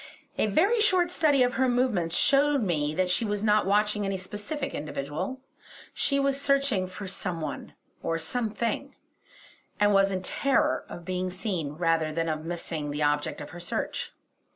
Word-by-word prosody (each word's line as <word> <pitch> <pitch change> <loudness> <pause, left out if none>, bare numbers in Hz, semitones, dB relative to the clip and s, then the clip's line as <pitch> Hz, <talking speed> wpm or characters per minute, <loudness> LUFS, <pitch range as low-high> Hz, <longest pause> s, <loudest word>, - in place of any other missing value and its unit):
A - - +3
very 395 - +3
short 365 -4 +3
study 290 -6 +4
of 245 0 +1
her 260 -1 +2
movements 225 -10 +1
showed 280 -1 +4
me 155 -5 0
that 185 +1 +1
she 205 - +2
was 210 -1 -1
not 210 -2 +3
watching 210 +1 +2
any 195 -1 -1
specific 210 +10 -5
individual. 150 - -4 0.5
She 280 -1 +1
was 275 0 +1
searching 275 -9 +2
for 190 +2 -7
some 180 -2 -3
one, 155 - -6 0.3
or 165 - -1
some 220 +8 -1
thing; 235 +5 -3 0.8
and 205 0 +4
was 195 0 +5
in 190 -1 -3
terror 275 +7 +1
of 175 - -9
being 185 0 -2
seen, 180 -6 -3
rather 165 -1 +1
than 165 +1 -1
of 155 0 -3
missing 165 -3 -4
the 150 +1 -2
object 145 0 0
of 145 - -8
her 175 - -9
search. 175 - -3
195 Hz, 175 wpm, -27 LUFS, 165-260 Hz, 0.8 s, was